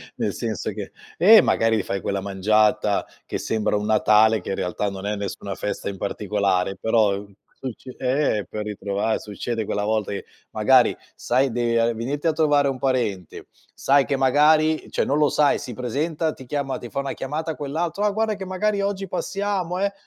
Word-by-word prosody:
nel - - -2
senso - - -3
che - - -7 0.3
ehm, 220 0 +8
magari 115 0 +2
ti - - -1
fai 95 0 -3
quella 100 +2 -2
mangiata, 105 +1 +2 0.2
che - - -3
sembra 110 -1 0
un 105 - -3
Natale 110 0 +4
che - - -8
in 95 - -1
realtà 90 +3 -2
non 95 0 -7
è 105 - -1
nessuna 100 -1 -5
festa 105 -1 -4
in 100 - -6
particolare, 100 -1 -1
però, 105 0 +2
uhm, 100 0 -11 0.3
succ 130 -2 -7
ehm, 130 -5 +1
per 105 - -4
ritrova 105 +1 -2
succede 110 +2 -4
quella 105 0 -2
volta 110 -1 -1
che, 100 - -5 0.3
magari - - +4 0.2
sai 130 +2 +1
deve 120 0 +1
a 115 +1 +2
venirti 135 +7 -4
a 165 - +4
trovare 145 -2 +3
un 135 -2 -2
parente, 115 - -2 0.3
sai 140 +1 +3
che 140 - 0
magari 150 +4 +3
cioè - - 0
non 145 +2 +1
lo 150 - +4
sai, 145 +2 +3
si 130 -4 -7
presenta, 150 +6 -2
ti 130 - -13
chiama 140 -1 -2
ti 120 - -8
fa - - -4
una 140 0 -3
chiamata 155 +4 -3
quell'altro: 160 +6 -3
"Ah, 210 - +4
guarda 220 +1 0
che 195 -1 -7
magari 200 +2 0
oggi 200 -1 -2
passiamo 190 -1 -2
eh!". 200 +1 0
125 Hz, 190 wpm, -23 LUFS, 105-150 Hz, 0.3 s, ehm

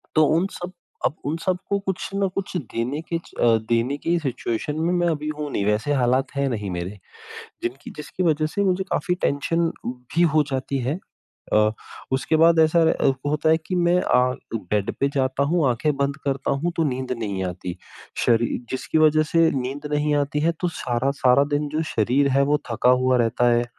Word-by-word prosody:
तो 155 - +6
उन 180 +3 +2
सब 175 0 -7 0.3
अब - - 0
उन 150 +3 -1
सब 185 -1 +1
को 200 - +1
कुछ 190 -2 -3
न 195 -1 +1
कुछ 195 -1 -3
देने 130 -1 -3
के - - +2
अ, 165 - -7 0.3
देने 120 +4 +1
की 170 +3 0
सिचुएशन 135 +1 -3
में 170 +2 +1
मैं 175 -1 +1
अभी 150 -2 -2
हूँ 150 -1 -3
नहीं 100 - -1
वैसे 105 +8 +1
हालात 125 +2 +2
हैं 140 0 +1
नहीं 105 -6 -3
मेरे। 90 0 -3 0.7
जिनकी 125 +3 -5
जिसकी 150 +4 -5
वज़ह 155 -3 +2
से 200 +6 -2
मुझे 190 0 +1
काफ़ी 180 -3 0
टेंशन 165 +4 +1 0.2
भी 125 +7 -2
हो 155 - +5
जाती 135 +1 -2
है। 145 +7 -1 0.6
अ, 105 0 +4 0.4
उसके 135 +4 +1
बाद 165 0 +5
ऐसा 160 +1 +4
र 135 - +2
होता 150 +1 +1
है 160 - +5
कि 185 - -1
मैं 175 0 +3
अ, 125 0 +2 0.2
बेड 105 -1 -1
पे 140 - +3
जाता 135 0 +1
हूँ, 155 0 +2
आँखें 135 +5 0
बंद 140 0 0
करता 135 0 -1
हूँ 160 +6 -1
तो 165 - +3
नींद 130 0 -4
नहीं 100 -4 -2
आती 90 -1 -5 0.5
शरीर 120 0 +2
जिसकी 130 +4 -1
वज़ह 155 0 +5
से 165 -1 +5
नींद 135 +4 -5
नहीं 150 0 +1
आती 145 0 0
है 165 +2 +3
तो 180 - +1 0.2
सारा-सारा 130 +2 +2
दिन 145 0 -1
जो 155 +2 -1
शरीर 125 +6 +3
है 140 - +5
वो 150 - +4
थका 115 +2 +2
हुआ 130 0 +3
रहता 120 +1 +2
है 120 0 +2
140 Hz, 195 wpm, -23 LUFS, 125-160 Hz, 0.7 s, तो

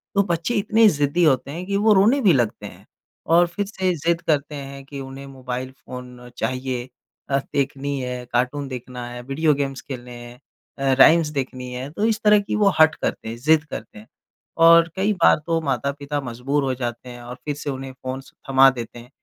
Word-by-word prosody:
तो 200 - +4
बच्चे 170 +5 -1
इतने 220 +2 +4
ज़िद्दी 145 +1 +1
होते 140 -3 +2
हैं 175 +4 -6
कि 200 0 -1
वो 215 +1 +4
रोने 215 +8 +4
भी 200 -8 +5
लगते 120 -6 0
हैं। - - -11 0.4
और 170 +2 +4
फिर 200 +4 -3
से 190 -2 -1
ज़िद 170 +2 0
करते 150 -3 -1
हैं 140 -1 -8
कि 140 0 -8
उन्हें 135 +1 -8
मोबाइल 130 -1 -6
फ़ोन 125 -2 -11
चाहिए। 130 +1 -3 0.4
अ, 135 - +2 0.2
देखनी 140 0 -1
है 125 -1 -5
कार्टून 130 +4 0
देखना 125 -1 -7
है, 120 0 -7
वीडियो 145 +5 +1
गेम्स 135 -1 -3
खेलने 125 -2 -8
हैं 120 +1 -13 0.4
अ, 135 -1 +2
राइम्स 165 +3 +7
देखनी 130 -3 -4
है। 125 +2 -5
तो 205 +7 -1
इस 225 -2 +1
तरह 210 -1 +6
की 200 - -3
वो 205 -2 +4
हठ 160 0 +7
करते - - -4
हैं, 115 - -5
ज़िद 155 +4 +3
करते 115 -9 -9
हैं। 110 - -16 0.5
और 165 0 +7
कई 195 +3 +1
बार 175 -4 +5
तो 165 -1 +1
माता-पिता 140 +1 -2
मजबूर 135 +3 -2
हो 135 -1 0
जाते 120 0 -5
हैं 120 0 -10
और 120 +1 -8
फिर 145 -1 -2
से 145 0 -5
उन्हें 135 -1 -5
फ़ोन्स 130 +1 -7 0.2
थमा 135 0 +7
देते 120 -2 -7
हैं। 120 +1 -14
140 Hz, 205 wpm, -22 LUFS, 125-165 Hz, 0.5 s, राइम्स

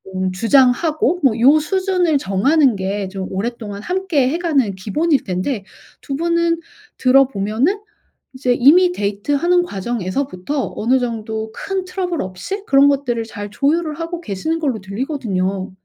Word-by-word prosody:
음 185 0 -1
주장하고 270 - +2
뭐 235 -5 +3
요 285 +5 +6
수준을 365 -1 +1
정하는 260 +7 +2
게 195 +1 -3
좀 190 -1 -5
오랫동안 205 0 -4
함께 360 -8 0
해 320 - -1
가는 285 - +1
기본일 280 - 0
텐데 195 +4 -2 0.4
2 275 - -4
분은 335 +1 +1 0.4
들어 265 +1 +5
보면은 245 - -1 0.5
이제 255 -1 +1
이미 325 +9 +5
데이트하는 285 - +1
과정에서부터 240 - -3
어느 255 +4 +2
정도 220 -2 -4
큰 390 -1 -3
트러블 365 -2 -3
없이 190 - -5
그런 275 +1 +6
것들을 260 -5 0
잘 205 -2 -7
조율을 305 +5 0
하고 335 +1 -4
계시는 315 - -3
걸로 270 -8 -1
들리거든요. 195 -4 -3
265 Hz, 310 characters per minute, -19 LUFS, 205-325 Hz, 0.5 s, 요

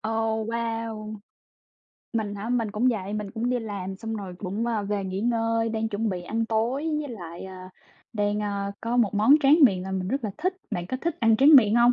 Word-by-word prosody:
Ồ, 220 0 -1
wow! 225 -1 -4 0.9
Mình 215 -3 -2
hả? 205 +3 -5
Mình 230 -4 0
cũng 225 +5 +1
vậy, 205 -4 -2
mình 210 -2 -4
cũng 230 +3 -2
đi 250 - +1
làm 200 -4 -5
xong 225 +2 -5
rồi 190 -4 -7
cũng, 205 +4 -3
ờ, 225 -3 0
về 200 -1 -2
nghỉ 190 +1 -3
ngơi, 230 -1 +1
đang 220 0 -1
chuẩn 220 +1 -1
bị 180 -3 -3
ăn 225 +5 -2
tối, 240 +8 0
với 295 - -5
lại, 175 -8 -8
ờ, 190 0 -9 0.6
đang, 205 -1 0
a, 200 -1 -2
có 235 +1 -1
một 225 -4 +2
món 215 +8 +6
tráng 290 +2 +5
miệng 195 -9 +5
làm 190 0 -3
mình 185 0 -3
rất 270 +2 -2
là 215 - -1
thích. 370 +4 -1
Bạn 175 0 -3
có 255 - -3
thích 340 -1 -2
ăn 225 -2 +4
tráng 285 +4 +8
miệng 220 -5 +5
hông? 240 +1 +6
220 Hz, 225 wpm, -26 LUFS, 205-235 Hz, 0.9 s, tráng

